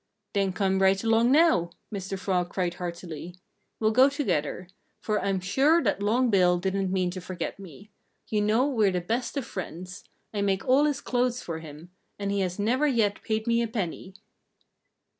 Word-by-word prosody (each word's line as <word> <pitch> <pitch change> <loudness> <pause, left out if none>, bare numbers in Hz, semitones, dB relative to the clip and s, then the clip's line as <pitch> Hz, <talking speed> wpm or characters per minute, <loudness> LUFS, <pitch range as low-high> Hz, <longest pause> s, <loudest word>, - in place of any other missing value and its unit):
"Then 195 -2 +1
come 190 +1 0
right 195 +1 +3
along 230 +2 +3
now!" 295 - +4 0.2
Mr. 195 0 -4
Frog 180 -2 -1
cried 180 -1 -1
heartily. 175 -2 -7 0.4
"We'll 215 -1 +2
go 255 +5 +6
together. 185 - -2 0.3
For 210 -1 -1
I'm 195 -1 0
sure 270 - +3
that 200 -3 0
Long 235 +4 +2
Bill 180 -3 +4
didn't 190 +1 -1
mean 185 -2 0
to 185 0 -6
forget 185 +2 -5
me. 195 +3 -12 0.4
You 210 -1 0
know 215 +5 +3
we're 225 -8 +2
the 180 -1 -1
best 230 - -2
of 270 - -2
friends. 180 -3 -7 0.3
I 205 - -1
make 195 +1 0
all 270 +3 +5
his 295 -3 0
clothes 250 0 0
for 165 -2 -5
him; 160 +2 -11 0.3
and 200 -1 -2
he 200 - 0
has 185 -2 -1
never 245 +8 +1
yet 225 -7 +1
paid 220 0 -2
me 235 0 +2
a 235 - 0
penny." 190 -3 -4
200 Hz, 180 wpm, -27 LUFS, 180-230 Hz, 0.4 s, go